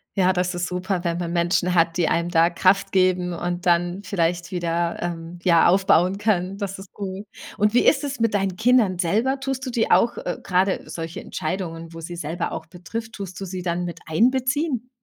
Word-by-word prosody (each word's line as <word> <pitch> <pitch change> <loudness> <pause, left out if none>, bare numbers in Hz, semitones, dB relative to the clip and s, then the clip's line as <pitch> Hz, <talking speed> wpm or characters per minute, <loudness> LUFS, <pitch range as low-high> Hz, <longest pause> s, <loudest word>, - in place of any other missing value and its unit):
Ja, 185 -2 +4
das 180 0 0
ist 175 0 -2
super, 180 0 -2
wenn 170 0 -1
man 170 -1 -3
Menschen 175 +1 +1
hat, 165 -1 +2
die 175 - +2
einem 170 +1 0
da 170 0 +4
Kraft 185 +3 +2
geben 185 -1 +2
und 175 +2 -3
dann 175 +2 +1
vielleicht 175 -2 -1
wieder, 170 -1 -1
ähm, 170 0 -5
ja, 170 -2 +5
aufbauen 185 0 +3
können. 195 -2 0
Das 195 -2 -4
ist 190 0 -12
gut, 195 0 -6 0.3
und 210 +1 +2
wie 245 - +4
ist 275 - +4
es 280 -2 -4
mit 225 -2 +1
deinen 195 -2 0
Kindern 225 -4 +3
selber? 225 +10 +1
Tust 270 -1 -3
du 255 - -3
die 235 -2 0
auch 235 - +4
äh, 175 - -3
gerade 190 +1 +1
solche 165 0 -6
Entscheidungen, 165 -1 -5
wo 165 - -7
sie 170 +2 -7
selber 170 +1 -3
auch - - -6
betrifft, 205 +6 -7
tust 190 -3 -7
du - - -3
sie 185 -1 -5
dann 175 0 -1
miteinbeziehen? 250 - 0
180 Hz, 200 wpm, -23 LUFS, 170-200 Hz, 0.3 s, ja